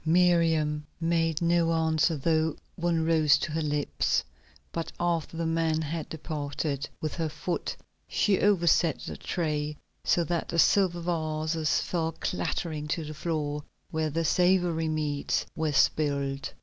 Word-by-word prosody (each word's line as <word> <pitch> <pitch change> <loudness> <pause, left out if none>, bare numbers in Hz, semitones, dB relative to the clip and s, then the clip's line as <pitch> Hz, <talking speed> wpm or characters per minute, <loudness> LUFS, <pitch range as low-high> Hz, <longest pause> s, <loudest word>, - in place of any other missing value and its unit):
Miriam 165 -3 +3 0.2
made 165 -1 +1
no 170 0 +3
answer, 160 0 +2
though 160 +1 +1 0.2
one 170 -2 0
rose 155 -3 +5
to 155 - -3
her 160 +1 -1
lips; 150 -1 0 0.5
but 165 -1 -4
after 165 -2 -1
the 165 - -1
man 165 -1 +1
had 155 +1 -4
departed, 145 -2 -3
with 155 - -3
her 165 -2 -2
foot 165 +4 -3 0.3
she 200 -3 +2
overset 170 -5 +3
the - - -6
tray 150 -3 -2 0.3
so 175 - +3
that 170 0 -2
the 170 - -2
silver 175 +1 +4
vases 155 -2 0
fell 165 -2 -1
clattering 155 -3 -3
to 160 +1 -2
the 155 - -6
floor, 150 -2 -2 0.3
where 160 0 0
the 165 +2 -1
savory 175 -1 +2
meats 150 -2 -1
were 160 -1 0
spilled. 140 -1 +1
160 Hz, 140 wpm, -28 LUFS, 150-170 Hz, 0.5 s, rose